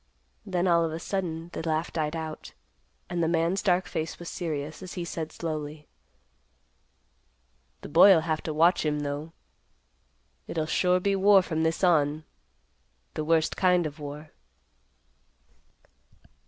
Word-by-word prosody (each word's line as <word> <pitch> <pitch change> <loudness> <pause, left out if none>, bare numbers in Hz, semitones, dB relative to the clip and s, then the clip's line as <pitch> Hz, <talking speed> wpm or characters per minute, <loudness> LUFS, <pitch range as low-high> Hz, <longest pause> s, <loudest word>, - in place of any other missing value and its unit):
Then 185 -1 0
all 170 -1 +4
of 165 - -1
a 160 - -4
sudden 170 -2 -4
the - - -4
laugh 160 0 -2
died 155 -1 -1
out, 160 -1 -6 0.5
and 175 -1 -2
the 165 - +2
man's 170 +3 +1
dark 185 -1 +2
face 160 0 -4
was 175 - -8
serious, 155 -2 -4
as 185 -1 -8
he 175 -2 -4
said, 160 -2 -5
slowly, 150 -2 -5 1.9
"The - - -8
boy'll 190 -5 +7
have 160 -1 -2
to 160 - -2
watch 170 +3 +4
him, 150 -1 0
though. 145 +2 -4 1.2
It'll 160 -2 -2
sure 180 +3 +2
be 200 +2 +1
war 195 0 +5
from 160 -3 -2
this 160 +3 0
on; 155 -3 +3 0.9
the 155 - -3
worst 160 +1 +2
kind 180 -2 +3
of 155 +1 -6
war." 150 +1 -8
165 Hz, 140 wpm, -27 LUFS, 155-175 Hz, 1.9 s, boy'll